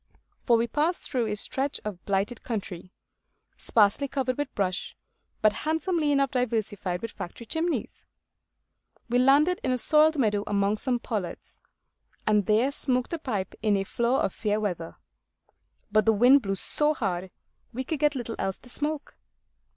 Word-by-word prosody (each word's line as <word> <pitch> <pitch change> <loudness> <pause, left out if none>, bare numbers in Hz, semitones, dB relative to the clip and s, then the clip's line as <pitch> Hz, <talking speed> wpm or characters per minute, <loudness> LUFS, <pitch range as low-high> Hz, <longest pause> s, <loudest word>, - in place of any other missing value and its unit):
For 235 -2 +6
we 230 - +1
passed 300 +8 0
through 245 -4 0
a 210 - -1
stretch 270 +6 -1
of 200 -4 -6
blighted 200 +4 -1
country, 195 -6 -5 0.6
sparsely 215 +6 +2
covered 260 -2 -1
with 290 -2 -2
brush, 185 -2 -2 0.5
but 215 -1 +5
handsomely 320 - 0
enough 275 -2 +2
diversified 215 -7 -2
with 230 - -4
factory 180 +6 -8
chimneys. 325 +7 -3 1.1
We 245 +1 +3
landed 290 +7 +4
in 255 - +1
a 255 - +1
soiled 305 +4 +4
meadow 210 -6 +1
among 205 0 +1
some 250 +2 0
pollards, 210 -7 -5 0.6
and 210 -3 +2
there 225 +6 +3
smoked 255 0 -1
a 335 - -2
pipe 210 -10 -3
in 210 -2 +2
a 195 - 0
flaw 235 +6 0
of - - 0
fair 210 -1 -1
weather. 175 -6 -3 1.0
But 215 +1 +3
the 225 - +6
wind 250 +6 +6
blew 195 -3 -2
so 300 +9 +2
hard, 190 -6 -2 0.4
we 255 +2 -4
could 300 +3 -3
get 295 0 +2
little 240 -3 -4
else 190 -1 -2
to 250 - -7
smoke. 295 +3 -3
235 Hz, 160 wpm, -27 LUFS, 205-275 Hz, 1.1 s, For